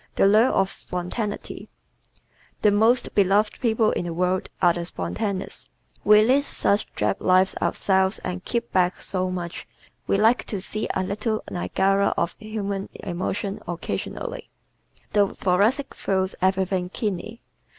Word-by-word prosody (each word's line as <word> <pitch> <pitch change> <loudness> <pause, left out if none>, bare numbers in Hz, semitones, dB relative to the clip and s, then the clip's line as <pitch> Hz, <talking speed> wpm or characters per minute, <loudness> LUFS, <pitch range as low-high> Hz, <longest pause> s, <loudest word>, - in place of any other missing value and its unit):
The - - +4
Lure 215 +5 +5
of 195 0 +1
Spontaneity 195 +4 -5 0.9
¶ - - -37
The 210 - +6
most 225 +4 +3
beloved 205 +2 +2
people 220 -2 +2
in - - -2
the 170 - -3
world 180 +1 0
are 175 -2 +5
the 175 - -4
spontaneous. 195 +2 -4 0.4
We 210 0 +7
lead 260 +5 +4
such 210 -6 0
drab 105 -2 0
lives 185 +1 +4
ourselves 190 0 +1
and 180 0 -4
keep 235 -1 -3
back 180 -1 +2
so 185 -1 -2
much, 175 -2 -5 0.4
we - - +2
like 225 +4 +3
to 205 - -4
see 215 +3 -3
a 190 - +1
little 215 +3 -2
Niagara 195 +2 +1
of 170 0 0
human 200 -2 -4
emotion 190 +3 -3
occasionally. 315 - -5 0.6
The 205 -2 +2
Thoracic 210 +10 +1
feels 190 -1 -1
everything 190 -1 +1
keenly. 215 +3 -4
195 Hz, 140 wpm, -24 LUFS, 185-215 Hz, 0.9 s, We